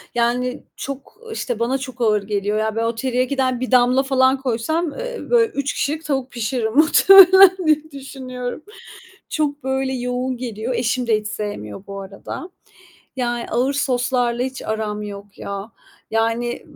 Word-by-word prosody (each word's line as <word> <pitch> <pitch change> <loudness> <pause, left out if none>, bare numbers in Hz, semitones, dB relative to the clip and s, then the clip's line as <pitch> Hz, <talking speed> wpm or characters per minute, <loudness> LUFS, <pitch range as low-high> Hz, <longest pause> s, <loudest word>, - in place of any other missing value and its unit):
yani 245 +2 0
çok, 275 +6 -7
işte, 245 - -3
bana 240 +3 +1
çok 260 -2 -8
ağır 210 -3 +2
geliyor. 205 +1 -1
Ya, 220 0 -1
ben 225 - 0
o 230 0 -1
teriyakidon 255 +1 0
bir 255 +1 -4
damla 250 +1 +4
falan 265 0 +2
koysam, 280 +7 -1
eee, - - -4
be 470 -1 +5
3 285 -10 -3
kişilik 310 +3 -2
tavuk 270 -3 -2
pişiririm, 230 -1 -2
muhtemelen 375 +4 +8
diye 310 0 +2
düşünüyorum. 260 -1 -7 0.7
Çok 295 -2 -2
böyle 265 0 -1
yoğun 250 0 -2
geliyor. 235 0 -4
Eşim 240 +1 0
de 220 -2 +2
hiç 210 - -10
sevmiyor 200 - -6
bu 200 0 -7
arada, 195 - -8 0.7
yani 240 -2 -2
ağır 250 +4 +1
soslarla 250 -3 0
hiç 265 +1 -4
aram 215 -1 -3
yok 200 -1 -9
ya. 200 +3 -6 0.4
Yani 230 +2 -1
250 Hz, 150 wpm, -21 LUFS, 225-270 Hz, 0.7 s, muhtemelen